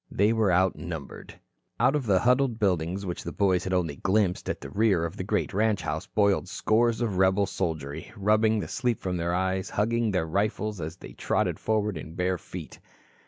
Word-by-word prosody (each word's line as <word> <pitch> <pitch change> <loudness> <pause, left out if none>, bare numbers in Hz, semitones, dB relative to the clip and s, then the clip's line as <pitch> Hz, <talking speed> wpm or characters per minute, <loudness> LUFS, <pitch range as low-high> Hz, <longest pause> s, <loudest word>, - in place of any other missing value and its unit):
They 105 +3 +2
were 110 -4 +2
outnumbered. 85 -4 -2 0.4
Out 130 +5 +4
of 140 -5 -1
the 95 -2 +4
huddled 125 -1 +3
buildings, 95 -2 0
which 90 -2 -4
the 85 - -5
boys 95 -2 +2
had 95 - -3
only 85 -6 0
glimpsed 95 -2 +1
at - - -2
the - - -9
rear 100 -6 +2
of 85 +2 -5
the 95 - -4
great 105 +2 -1
ranch 105 0 +1
house - - -3
boiled 100 -3 +1
scores 115 +3 +1
of 105 -6 -1
rebel 95 +2 +3
soldiery, 80 -7 -4
rubbing 110 +2 +3
the - - -4
sleep 120 -4 -1
from 90 -1 -2
their 85 +1 -1
eyes, 95 +1 -1
hugging 115 +2 +1
their 90 -5 0
rifles 105 +3 -1
as 80 +2 -5
they - - -11
trotted - - -1
forward 105 -5 0
in 80 +2 -9
bare 90 0 0
feet. 85 -7 -9
95 Hz, 195 wpm, -27 LUFS, 90-110 Hz, 0.4 s, Out